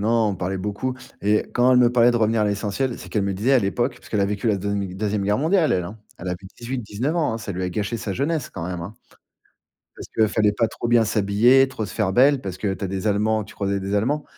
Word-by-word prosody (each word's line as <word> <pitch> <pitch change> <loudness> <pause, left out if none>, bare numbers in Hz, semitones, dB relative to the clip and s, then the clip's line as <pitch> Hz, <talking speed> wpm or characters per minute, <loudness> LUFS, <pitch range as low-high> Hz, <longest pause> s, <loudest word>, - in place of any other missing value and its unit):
non, 115 +1 +2
on 95 - -4
parlait 95 +2 -2
beaucoup 105 +7 -3 0.3
et 105 +1 +2
quand 125 +1 +3
elle 125 - +5
me 120 -1 +5
parlait 120 0 +5
de 120 - +1
revenir 115 -1 +2
à - - +3
l'essentiel, 105 +5 -1
c'est - - -11
qu'elle 105 - 0
me 100 0 -1
disait 110 +8 +1
à 130 - +6
l'époque 120 +5 -1
puisqu'elle 105 -3 -3
a - - +3
vécu 105 +3 -1
la 105 - +2
deuxi 100 -1 -3
deuxième 105 0 -1
guerre 105 +1 +1
mondiale 160 +3 +2
elle, 90 - +1
hein. 105 +6 -8 0.2
Elle 90 - -6
a - - -1
fait 90 +2 -6
18-19 120 +3 -3
ans, 160 -9 0
hein, - - -4
ça 100 -2 -5
lui 95 +1 -4
a 90 - -1
gâché 105 +5 -3
sa 100 -3 -4
jeunesse 145 - -1
quand 85 - -6
même, 90 -1 -4
hein. 100 +6 -8 1.0
Parce - - -8
que, 110 -1 +4
fallait 105 0 +2
pas 115 +1 +1
trop 120 - -5
bien 120 -1 +4
s'habiller, 115 +7 +4
trop 125 -5 -4
se - - -9
faire 105 -4 0
belle, 135 +4 +4
parce 95 -5 -6
que 100 0 -1
tu 95 - -7
as - - -2
des 95 +2 -4
allemands 105 +1 +1
tu - - -14
croisais 100 -1 -1
des 100 +1 -2
allemands. 140 +9 0
105 Hz, 270 wpm, -23 LUFS, 100-120 Hz, 1.0 s, à